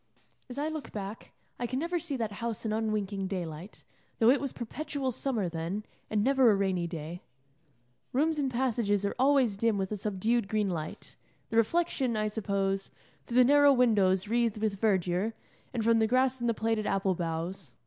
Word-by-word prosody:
As 250 Hz, -, -8 dB
I 295 Hz, +2 st, -1 dB
look 315 Hz, -2 st, -5 dB
back, 205 Hz, +1 st, -7 dB, 0.3 s
I 240 Hz, -, -1 dB
can 255 Hz, -, -3 dB
never 340 Hz, +4 st, -1 dB
see 310 Hz, -4 st, -3 dB
that 225 Hz, -3 st, -2 dB
house 230 Hz, -1 st, -3 dB
in 215 Hz, -, 0 dB
unwinking 210 Hz, -3 st, -1 dB
daylight, 175 Hz, -1 st, -6 dB, 0.3 s
though 230 Hz, +2 st, +6 dB
it 280 Hz, -, +2 dB
was 275 Hz, -2 st, -2 dB
perpetual 270 Hz, +2 st, -4 dB
summer 230 Hz, -5 st, -1 dB
then, 170 Hz, +5 st, -3 dB, 0.3 s
and 210 Hz, -1 st, +1 dB
never 265 Hz, -1 st, +5 dB
a 210 Hz, -, +5 dB
rainy 190 Hz, -3 st, 0 dB
day. 165 Hz, +1 st, -6 dB, 0.9 s
Rooms 305 Hz, +4 st, +1 dB
and 275 Hz, -2 st, +1 dB
passages 235 Hz, -5 st, 0 dB
are 200 Hz, -, -1 dB
always 260 Hz, -6 st, +3 dB
dim 225 Hz, 0 st, +2 dB
with 190 Hz, 0 st, -2 dB
a 210 Hz, -, -2 dB
subdued 210 Hz, +3 st, 0 dB
green 210 Hz, -2 st, 0 dB
light, 155 Hz, -3 st, -6 dB, 0.3 s
the 225 Hz, -, 0 dB
reflection, 260 Hz, -1 st, +1 dB
I 215 Hz, 0 st, 0 dB
suppose, 195 Hz, -2 st, -1 dB, 0.4 s
through 240 Hz, -, -1 dB
the 255 Hz, -, +8 dB
narrow 285 Hz, +2 st, +6 dB
windows 205 Hz, -7 st, +3 dB
wreathed 230 Hz, -1 st, +1 dB
with 210 Hz, -2 st, -1 dB
verdure, 190 Hz, 0 st, +1 dB, 0.4 s
and 235 Hz, -3 st, -2 dB
from 230 Hz, 0 st, +4 dB
the 220 Hz, -, +3 dB
grass 255 Hz, +2 st, +2 dB
and 240 Hz, 0 st, 0 dB
the 230 Hz, -, +1 dB
plaited 220 Hz, -1 st, 0 dB
apple 195 Hz, -1 st, +1 dB
boughs. 170 Hz, -1 st, -4 dB
220 Hz, 185 wpm, -30 LUFS, 195-250 Hz, 0.9 s, the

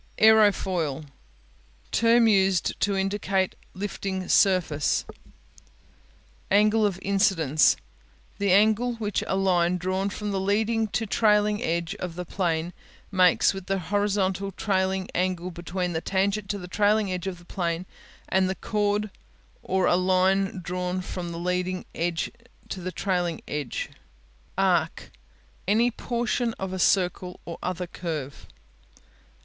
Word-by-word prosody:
Aerofoil 190 Hz, -9 st, +3 dB, 0.9 s
Term 230 Hz, 0 st, +4 dB
used 195 Hz, -4 st, +2 dB
to 200 Hz, 0 st, +1 dB
indicate 195 Hz, -1 st, 0 dB, 0.2 s
lifting 190 Hz, -1 st, -4 dB
surface, 180 Hz, -7 st, +3 dB, 1.4 s
Angle 210 Hz, +2 st, +4 dB
of 195 Hz, -3 st, -3 dB
Incidence 190 Hz, -7 st, +3 dB, 0.6 s
The 200 Hz, -1 st, +2 dB
angle 220 Hz, +5 st, +3 dB
which 210 Hz, -3 st, -2 dB
a -, -, 0 dB
line 180 Hz, -2 st, +2 dB
drawn 185 Hz, +2 st, -1 dB
from 210 Hz, +1 st, -4 dB
the 195 Hz, -, -1 dB
leading 220 Hz, +3 st, +1 dB
to 220 Hz, +2 st, -2 dB
the 200 Hz, -, -14 dB
trailing 210 Hz, -1 st, +3 dB
edge 170 Hz, +2 st, -1 dB
of 180 Hz, -2 st, -5 dB
the 180 Hz, 0 st, -5 dB
plane 170 Hz, -2 st, -1 dB, 0.4 s
makes 185 Hz, -1 st, +4 dB
with 195 Hz, -1 st, -8 dB
the 195 Hz, -, 0 dB
horizontal 195 Hz, +1 st, 0 dB
trailing 190 Hz, -1 st, 0 dB
angle 180 Hz, 0 st, -1 dB
between 175 Hz, +1 st, -3 dB
the 160 Hz, -, -2 dB
tangent 195 Hz, +2 st, 0 dB
to 205 Hz, -, -1 dB
the 180 Hz, -2 st, -8 dB
trailing 205 Hz, +1 st, +2 dB
edge 180 Hz, +1 st, -4 dB
of 185 Hz, -2 st, -4 dB
the 175 Hz, -, -17 dB
plane 170 Hz, -1 st, -2 dB, 0.4 s
and 190 Hz, 0 st, +2 dB
the 190 Hz, -, -2 dB
chord 210 Hz, +1 st, -1 dB, 0.5 s
or 190 Hz, 0 st, 0 dB
a -, -, +4 dB
line 185 Hz, +1 st, +2 dB
drawn 180 Hz, +1 st, -2 dB
from 180 Hz, -1 st, -5 dB
the 170 Hz, -, -6 dB
leading 180 Hz, +1 st, -2 dB
to 185 Hz, +4 st, -5 dB
the 185 Hz, +1 st, -4 dB
trailing 180 Hz, -4 st, -1 dB
edge. 145 Hz, -4 st, -4 dB, 0.7 s
Arc 175 Hz, -4 st, +1 dB, 0.6 s
Any 230 Hz, +5 st, +3 dB
portion 235 Hz, 0 st, -1 dB
of 190 Hz, -1 st, -4 dB
a 190 Hz, -, -3 dB
circle 180 Hz, -1 st, +1 dB
or 170 Hz, -, -7 dB
other 180 Hz, 0 st, -3 dB
curve. 155 Hz, -6 st, -6 dB
190 Hz, 130 wpm, -26 LUFS, 180-205 Hz, 1.4 s, Term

